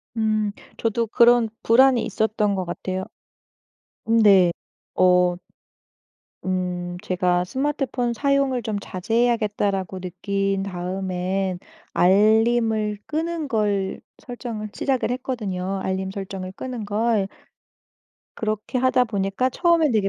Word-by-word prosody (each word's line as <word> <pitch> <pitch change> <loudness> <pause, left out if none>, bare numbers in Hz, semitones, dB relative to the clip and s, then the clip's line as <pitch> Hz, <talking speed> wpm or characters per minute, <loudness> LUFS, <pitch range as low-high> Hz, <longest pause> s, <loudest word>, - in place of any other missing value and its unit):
음 215 -2 +1 0.3
저도 230 0 0
그런 235 +1 +5
불안이 250 0 +5
있었던 215 -2 0
것 185 -1 -2
같아요. 185 +2 -4 1.0
음 225 +1 +3
네. 190 -4 +6 0.4
어 180 -1 +4 1.1
음 180 -1 -2
제가 180 -1 +1
'스마트폰 260 0 -1
사용을 275 -1 +1
좀 220 -2 -2
자제해야겠다.'라고 205 -3 0
느낀 195 +2 -2
다음에 185 0 -2 0.4
알림을 215 +2 +3
끄는 320 0 -2
걸 205 -6 -1 0.2
설정을 230 -4 -6
시작을 260 -3 0
했거든요 195 -7 -3
알림 190 0 -2
설정을 190 -1 -6
끄는 250 -4 -5
걸. 210 -1 +1 1.1
그렇게 215 +3 -2
하다 255 0 +3
보니까 205 +3 -1
처음에는 335 -1 +3
되게 210 -3 +2
210 Hz, 240 characters per minute, -23 LUFS, 190-240 Hz, 1.1 s, 네